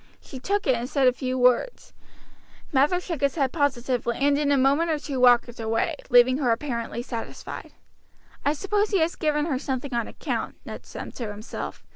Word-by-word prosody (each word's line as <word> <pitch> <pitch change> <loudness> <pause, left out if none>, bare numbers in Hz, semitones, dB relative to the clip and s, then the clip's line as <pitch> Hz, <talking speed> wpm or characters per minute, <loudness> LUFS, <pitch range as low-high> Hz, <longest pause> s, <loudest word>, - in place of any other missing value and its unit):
She 265 - -10
took 400 +9 -1
it, 265 - +4
and 240 +1 -3
said 275 -3 +2
a 250 - +5
few 255 0 -3
words. 250 - +1 0.8
Mather 295 +7 +3
shook 340 -5 -5
his 280 -1 +1
head 275 -5 +1
positively, 255 -5 0
and 285 +1 +3
in 285 0 +1
a 285 - +4
minute 280 +6 +3
or 315 - +1
two 285 -3 -4
walked 245 -1 +4
away, 225 +8 0
leaving 250 +1 +5
her 260 -5 +1
apparently 235 -2 -2
satisfied. 230 -3 -7 0.7
"I 290 - +2
suppose 410 +6 0
he 400 - +2
has 325 +1 +1
given 300 -2 0
her 275 -6 -1
something 265 -1 -4
on 235 -1 -1
account," - - -4
Ned - - -8
said - - -8
to 235 -4 -4
himself. 210 +2 -7
270 Hz, 190 wpm, -25 LUFS, 245-300 Hz, 0.8 s, a